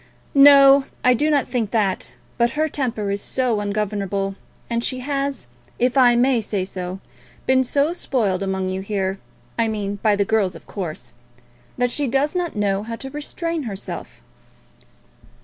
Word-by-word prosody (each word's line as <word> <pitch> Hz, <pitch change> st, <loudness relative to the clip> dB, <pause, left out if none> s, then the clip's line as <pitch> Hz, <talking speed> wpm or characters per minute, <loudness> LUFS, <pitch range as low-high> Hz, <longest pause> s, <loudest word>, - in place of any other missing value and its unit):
"No; 275 Hz, -1 st, +8 dB, 0.2 s
I 250 Hz, -, +6 dB
do 295 Hz, +6 st, +1 dB
not 290 Hz, -3 st, +2 dB
think 230 Hz, -5 st, -1 dB
that. 205 Hz, -4 st, 0 dB, 0.3 s
But 235 Hz, 0 st, +2 dB
her 310 Hz, +1 st, +2 dB
temper 235 Hz, -9 st, -2 dB
is 200 Hz, 0 st, -2 dB
so 250 Hz, -5 st, 0 dB
ungovernable, 200 Hz, -1 st, -2 dB, 0.3 s
and 235 Hz, 0 st, -1 dB
she 255 Hz, 0 st, -1 dB
has, 275 Hz, -, -2 dB, 0.3 s
if 250 Hz, +2 st, +1 dB
I 245 Hz, -3 st, +6 dB
may 245 Hz, 0 st, +3 dB
say 200 Hz, -3 st, -2 dB
so, 185 Hz, 0 st, -6 dB, 0.5 s
been 260 Hz, 0 st, +4 dB
so 285 Hz, +5 st, +1 dB
spoilt 215 Hz, -, -1 dB
among 190 Hz, -1 st, -1 dB
you 190 Hz, 0 st, -3 dB
here, 195 Hz, -1 st, -2 dB, 0.4 s
I 230 Hz, -, +3 dB
mean 205 Hz, -2 st, -3 dB
by 210 Hz, 0 st, +2 dB
the 200 Hz, 0 st, +1 dB
girls, 205 Hz, -5 st, +1 dB
of 165 Hz, -, -12 dB
course, 155 Hz, -, -6 dB, 0.6 s
that 245 Hz, 0 st, +1 dB
she 285 Hz, +2 st, -1 dB
does 275 Hz, +4 st, +1 dB
not 355 Hz, -5 st, -2 dB
know 200 Hz, -1 st, 0 dB
how 230 Hz, +2 st, -5 dB
to 270 Hz, +3 st, -8 dB
restrain 330 Hz, +3 st, -3 dB
herself." 195 Hz, -1 st, -7 dB
230 Hz, 165 wpm, -21 LUFS, 200-270 Hz, 0.6 s, No